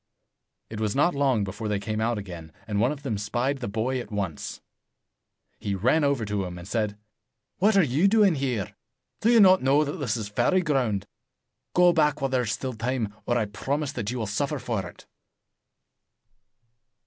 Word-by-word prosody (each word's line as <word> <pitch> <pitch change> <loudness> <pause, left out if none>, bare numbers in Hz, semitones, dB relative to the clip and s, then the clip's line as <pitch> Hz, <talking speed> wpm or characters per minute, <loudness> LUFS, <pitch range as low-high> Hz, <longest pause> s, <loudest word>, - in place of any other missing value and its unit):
It 110 - -5
was 105 -2 -1
not 170 +6 +3
long 135 -6 +2
before 100 +3 -5
they 105 -1 0
came 110 +1 -3
out 115 0 0
again, 85 -5 -8
and 105 -2 -2
one 120 +5 +3
of 150 -1 -7
them 110 -8 -2
spied 120 +7 -1
the 120 - -4
boy 115 +5 -1
at 120 - -7
once. 95 -8 -4 1.0
He 100 -1 -2
ran 130 - +2
over 140 -5 +1
to 105 -1 -1
him, 90 -1 -6
and 85 +1 -9
said, 105 -1 -1 0.6
"What 205 +2 +4
are 195 - +6
you 150 +7 +2
doing 205 -3 +5
here? 130 - -2 0.5
Do 225 - +2
you 235 - +6
not 190 -2 +7
know 140 +3 +4
that 145 -1 -4
this 120 -5 -1
is 110 -2 -4
fairy 105 - +1
82 185 - +2
ground? 110 -8 0 0.7
Go 180 -1 +6
back 150 -3 +2
while 135 -1 -1
there 130 -1 +2
is 115 -3 -2
still 125 +4 -3
time, 115 -2 -2
or 120 - +2
I 110 - +1
promise 135 +8 -2
you - - -18
that 110 -4 -2
you 125 - -3
will 115 - -2
suffer 140 +9 -1
for 110 -8 -3
it." - - -17
120 Hz, 200 wpm, -26 LUFS, 105-140 Hz, 1.0 s, not